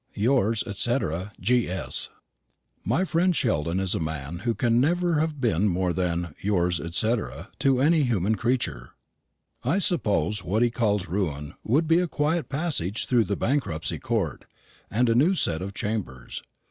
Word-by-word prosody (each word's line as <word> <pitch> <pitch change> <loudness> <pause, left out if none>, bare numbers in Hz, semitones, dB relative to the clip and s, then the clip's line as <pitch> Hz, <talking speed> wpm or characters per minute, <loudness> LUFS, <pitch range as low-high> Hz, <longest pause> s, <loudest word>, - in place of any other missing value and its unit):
"Yours, 115 -1 +2
&c. 120 +5 +2 0.4
G.S." 95 - +1 0.7
My 185 - +1
friend 175 +1 +2
Sheldon 85 - 0
is 95 -2 0
a - - -1
man 80 0 -4
who 115 +2 -1
can 120 -1 +2
never 175 +2 +2
have 155 -2 -1
been 105 -6 +2
more 90 -1 0
than 85 -2 -1
"yours 90 -4 +1
et 85 0 -4
cetera" 110 +2 0
to 135 -2 +3
any 155 +4 +4
human 110 -6 +1
creature. 110 - -2 0.7
I 185 - +1
suppose 105 - +1
what 110 +6 +1
he 120 - +2
calls 105 -5 0
ruin 80 -5 -2
would 150 +8 +2
be 165 +2 +4
a 180 - +1
quiet 155 +2 -1
passage 140 - -1
through 120 -3 +3
the 100 +1 -2
Bankruptcy 105 - -1
Court, - - -2 0.4
and 120 +4 +2
a 115 - +3
new 155 +11 +4
set 80 - 0
of 100 +1 -6
chambers. 100 - -4
110 Hz, 160 wpm, -26 LUFS, 90-135 Hz, 0.7 s, any